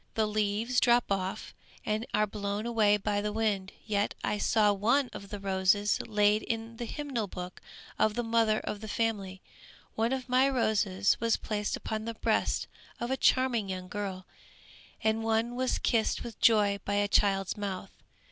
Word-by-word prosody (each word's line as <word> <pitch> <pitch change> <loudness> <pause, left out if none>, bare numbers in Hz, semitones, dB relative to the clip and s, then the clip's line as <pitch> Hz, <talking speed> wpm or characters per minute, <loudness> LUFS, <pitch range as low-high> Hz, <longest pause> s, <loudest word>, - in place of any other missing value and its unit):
The 220 - +2
leaves 215 +3 0
drop 240 -3 +3
off 190 -1 -2 0.3
and 215 +2 -1
are 210 +1 +2
blown 205 +1 -4
away 215 -3 +3
by 205 0 -1
the 210 0 -2
wind. 210 -3 -1
Yet, 205 -2 0
I 210 - -1
saw 210 -1 +3
one 240 +7 +2
of 200 - -9
the 205 - -6
roses 195 +1 +2
laid 210 -1 +3
in 225 0 -4
the 240 - -4
hymn 295 +5 -6
book 185 -6 -4 0.4
of 215 -1 +2
the 240 - -1
mother 225 -1 +2
of 205 - -5
the 220 - -7
family; 205 -4 -2 0.5
one 225 +2 0
of 265 -1 -2
my 255 +2 +4
roses 210 -6 +1
was 230 -1 +2
placed 210 -1 -2
upon 220 0 -4
the 230 0 -4
breast - - 0 0.3
of 240 +2 -3
a - - +2
charming 255 -6 +2
young 185 -1 -4
girl, 190 -2 -4 0.8
and 220 0 +1
one 225 +2 +1
was 255 0 0
kissed 225 -3 +1
with 235 -3 -8
joy 205 -3 +4
by 200 - -1
a 205 0 +2
child's 195 -2 +2
mouth. 195 -2 -5
215 Hz, 175 wpm, -30 LUFS, 200-230 Hz, 0.8 s, my